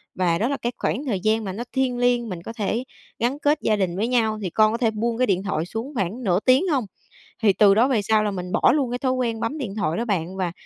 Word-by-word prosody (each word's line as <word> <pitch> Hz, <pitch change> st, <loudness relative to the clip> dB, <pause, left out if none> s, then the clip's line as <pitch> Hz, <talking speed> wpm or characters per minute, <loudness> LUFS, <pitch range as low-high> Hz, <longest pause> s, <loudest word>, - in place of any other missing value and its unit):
và 175 Hz, -2 st, +1 dB
đó 225 Hz, -, 0 dB
là 280 Hz, +1 st, -1 dB
cái 240 Hz, -, -2 dB
khoảng 290 Hz, -, -2 dB
thời 210 Hz, -8 st, -1 dB
gian 220 Hz, +3 st, +1 dB
mà 190 Hz, -2 st, -4 dB
nó 235 Hz, +4 st, -4 dB
thiêng 260 Hz, -2 st, 0 dB
liêng, 245 Hz, -1 st, +1 dB
mình 175 Hz, -3 st, -6 dB
có 225 Hz, -, -7 dB
thể 225 Hz, +2 st, -2 dB, 0.4 s
gắn 250 Hz, +5 st, 0 dB
kết 295 Hz, +1 st, +2 dB
gia 215 Hz, -, +2 dB
đình 185 Hz, -4 st, -1 dB
với 215 Hz, +4 st, 0 dB
nhau, 220 Hz, -3 st, +1 dB
thì 185 Hz, -, -2 dB
con 215 Hz, +4 st, +3 dB
có 230 Hz, -, -1 dB
thể 230 Hz, -3 st, +1 dB
buông 230 Hz, +2 st, -2 dB
cái 255 Hz, -1 st, +2 dB
điện 190 Hz, -1 st, +1 dB
thoại 170 Hz, -5 st, -2 dB
xuống 225 Hz, +10 st, -6 dB
khoảng 215 Hz, +5 st, -2 dB
nửa 180 Hz, -3 st, +2 dB
tiếng 260 Hz, -, +3 dB
hông?" 270 Hz, -9 st, +1 dB, 0.6 s
Thì 205 Hz, -3 st, +5 dB
từ 195 Hz, +1 st, +5 dB
đó 240 Hz, +5 st, +4 dB
về 230 Hz, -6 st, +1 dB
sau 215 Hz, +1 st, +2 dB
là 210 Hz, -, 0 dB
mình 180 Hz, -2 st, -5 dB
bỏ -, -, +4 dB
luôn 275 Hz, -5 st, 0 dB
cái 245 Hz, -, -2 dB
thói 255 Hz, 0 st, 0 dB
quen 235 Hz, -3 st, -1 dB
bấm 230 Hz, +7 st, -2 dB
điện 215 Hz, -8 st, -4 dB
thoại 165 Hz, -6 st, -1 dB
đó 235 Hz, -, -1 dB
bạn 190 Hz, -4 st, -2 dB
và 180 Hz, -3 st, -2 dB
220 Hz, 285 wpm, -23 LUFS, 195-245 Hz, 0.6 s, Thì